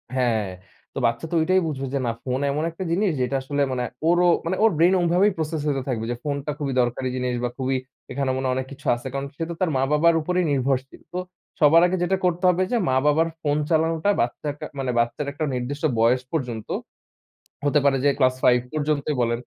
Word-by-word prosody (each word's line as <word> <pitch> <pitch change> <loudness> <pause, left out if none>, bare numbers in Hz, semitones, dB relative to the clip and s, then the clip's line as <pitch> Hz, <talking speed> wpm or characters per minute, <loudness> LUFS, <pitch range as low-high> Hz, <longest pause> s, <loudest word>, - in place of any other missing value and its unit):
হ্যাঁ। 115 -6 +1 0.4
তো - - -9
বাচ্চা 115 +6 0
তো - - 0
ঐটাই 185 +3 +3
বুঝবে 135 -3 -3
যে, 140 - +1
না, 115 - +1
ফোন 130 0 -1
এমন 150 +3 -1
একটা 175 +3 -6
জিনিস 195 +3 +2
যেটা 125 +2 0
আসলে 145 +2 -2
মানে 125 -1 -1 0.3
ওরও 175 0 +4 0.2
মানে 180 +3 0
ওর 225 - +6
ব্রেইন 175 +3 +5
ওমভাবেই 180 +4 +3
প্রসেস 160 -1 -2
হইতে 135 -2 0
থাকবে 115 -3 -2
যে - - -1
ফোনটা 145 0 -2
খুবই 140 -3 -2
দরকারি 120 +2 -1
জিনিস 125 -1 -1
বা 120 - 0
খুবই 130 0 0 0.3
এখানে 135 0 -1
মনে 130 0 -2
হয় 130 - +1
অনেক 130 0 -3
কিছু 145 +2 -12
আছে। 120 +2 -7
কারণ 140 0 -2
সে 165 - -3
তো 170 - -3
তার 185 - +2
মা-বাবার 150 +5 +3
উপরেই 180 +2 0
নির্ভরশীল। 135 -1 -1
তো 180 - -2 0.4
সবার 160 +2 +6
আগে 185 +1 -1
যেটা 190 +2 +1
করতে 180 +1 0
হবে 180 +1 +2
যে 245 - +2
মা-বাবার 150 +5 +3
ফোন 145 -1 +1
চালানোটা 160 +3 +1
বাচ্চার 140 +5 -2
কা - - -5
মানে 130 -2 -1
বাচ্চার 120 +5 0
একটা 155 +2 -3
নির্দিষ্ট 135 +4 -4 0.2
বয়স 120 +3 +4
পর্যন্ত 125 -8 -3 1.0
হতে 145 +1 +3
পারে 135 -1 +4
যে - - +5
class 130 -1 +3
5 125 -1 +5
পর্যন্তই 150 -1 -1
বলেন। 115 0 0
140 Hz, 210 wpm, -23 LUFS, 130-165 Hz, 1.0 s, ওর